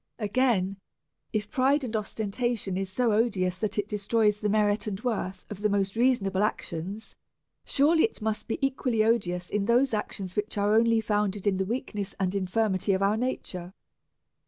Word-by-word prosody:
Again, 210 -4 +1 0.5
if 210 -1 -2
pride 275 +1 +2
and 235 -3 -3
ostentation 215 -1 -2
are 195 - -1
so 225 +5 0
odious 195 -5 +1
that 215 -2 -1
they 205 - 0
destroy 210 +1 +1
the 210 0 -3
merit 210 0 +2
and 195 -2 -3
worth 195 -6 -3
of 205 -1 -7
the 210 - +2
most 195 0 0
reasons 240 -3 +3
able 195 0 0
actions, 200 0 -3 0.5
surely 315 +7 +4
they - - -10
must 220 -1 -2
be - - -1
equally 255 -4 +1
odious 180 -6 0
in 205 -1 0
those 245 +3 +3
actions 195 -3 -3
which 210 +1 -2
are 205 +1 +2
only 230 0 +4
founded 210 -2 -1
in 200 -2 +2
the 190 - 0
Aveakness 210 -3 -4
and 185 -1 0
infirmity 195 0 +1
of 190 +1 +1
our 200 +2 +3
nature. 195 -6 -4
210 Hz, 175 wpm, -27 LUFS, 195-230 Hz, 0.5 s, surely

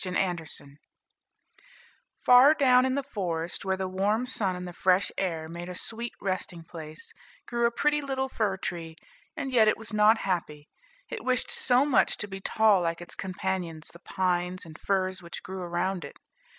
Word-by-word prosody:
THE 185 - -3
FIR 180 -2 0 0.2
TREE 140 0 -17 1.5
Far 255 +4 +8
down 255 -3 +5
in 260 - 0
the 280 - -1
forest, 175 -10 -3
where 190 -1 0
the 190 0 -2
warm 205 +6 0
sun 205 -7 0
and 180 0 -6
the 175 - -8
fresh 185 +1 +2
air 165 -4 -2
made 170 +2 -7
a 180 - -6
sweet 230 +5 -3
resting 185 -3 -3
place, 160 -1 -9 0.3
grew 235 -1 +1
a - - -1
pretty 295 +5 +1
little 265 -1 -2
fir 210 -6 -1
tree; 165 -3 -5 0.4
and 270 -2 -3
yet 225 -4 +5
it 215 - +3
was 225 0 -4
not 210 +1 +5
happy, 155 -5 -2 0.4
it - - -6
wished 255 -1 0
so 250 +2 +3
much 290 - +3
to 210 - -3
be 195 -1 -7
tall 215 -2 +4
like 170 -1 -1
its 175 - -8
companions 185 -4 -4
the 170 - -13
pines 180 0 -1
and 160 -1 -12
firs 190 -1 0
which 170 -1 -8
grew 190 0 -6
around 175 +1 -2
it. 140 - -10
190 Hz, 185 wpm, -28 LUFS, 175-225 Hz, 1.5 s, Far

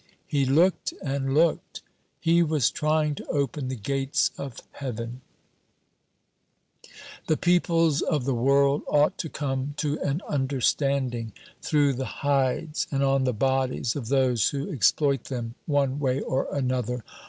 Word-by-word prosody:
He 140 -2 0
looked 170 +8 +2
and 135 -1 -1
looked. 165 +1 +1 0.4
He 170 +1 +3
was 155 -6 +2
trying 155 0 +1
to - - -9
open 140 -1 -1
the 130 - -3
gates 135 +5 0
of 135 -4 -7
heaven. 120 -2 -6 2.1
"The 155 - +2
peoples 165 -3 +2
of 150 -7 0
the 135 - +1
world 140 +4 +3
ought 150 0 +2
to 160 - -3
come 140 0 -3
to 150 -1 -1
an 145 +6 -2
understanding, 130 -4 0 0.3
through 145 -3 +2
the 130 +2 -6
hides 140 +2 0
and 140 -1 +1
on 135 -1 +2
the 130 - +2
bodies 130 0 0
of 130 -6 -4
those 130 -3 +2
who 145 +7 -4
exploit 140 -1 +2
them 120 -3 -5
one 140 -2 +1
way 130 -2 0
or 135 -1 -1
another. 125 -3 -1
140 Hz, 140 wpm, -26 LUFS, 130-150 Hz, 2.1 s, He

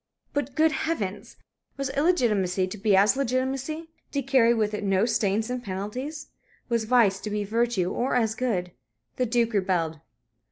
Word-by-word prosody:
But, 285 -2 -2
good 315 0 +4
Heavens! 220 - -3 0.4
was 275 -1 -2
illegitimacy 215 - +2
to 185 +3 -7
be 205 -1 +3
as 200 +5 +5
legitimacy? 270 +5 -2 0.2
to 280 -1 0
carry 255 -3 +4
with 215 -3 +1
it 210 - -3
no 195 +1 +2
stains 220 0 0
and 250 -1 -3
penalties? 245 +11 -5 0.4
Was 230 -2 +1
vice 215 -5 +4
to 210 - -5
be 210 0 -1
virtue, 215 -3 0
or 250 +2 -1
as 225 -3 +2
good? 210 -8 -2 0.5
The 250 - +1
Duke 235 0 +1
rebelled. 175 -6 0
230 Hz, 160 wpm, -26 LUFS, 200-260 Hz, 0.5 s, as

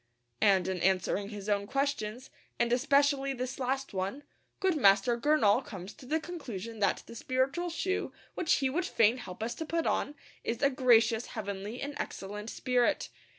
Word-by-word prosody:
And 190 -3 +4
in 190 -1 -2
answering 190 +2 +1
his 205 -2 -7
own 200 -1 +1
questions, 265 -2 -2 0.3
and 235 0 +2
especially 275 +1 +3
this 255 +1 -4
last 265 0 -2
one, 195 +9 -3 0.4
good 375 -3 +2
Master 205 -2 +5
Gurnall 240 -3 +3
comes 195 -3 -8
to 255 - -14
the 315 +4 +1
conclusion 230 - -7
that 200 -2 +1
the - - -11
spiritual 265 +9 -1
shoe 375 +3 -2 0.2
which 335 - +1
he 270 - +1
would 355 +5 0
fain 230 - +3
help 215 -4 -7
us 235 - -2
to 320 - -5
put 330 +1 -1
on 290 - 0 0.3
is 230 +4 -2
'a 280 - +5
gracious, 235 -3 +4
heavenly, 200 +2 -4
and 285 +1 -4
excellent 210 +3 -5
spirit.' 245 0 +1
245 Hz, 170 wpm, -31 LUFS, 205-280 Hz, 0.4 s, Master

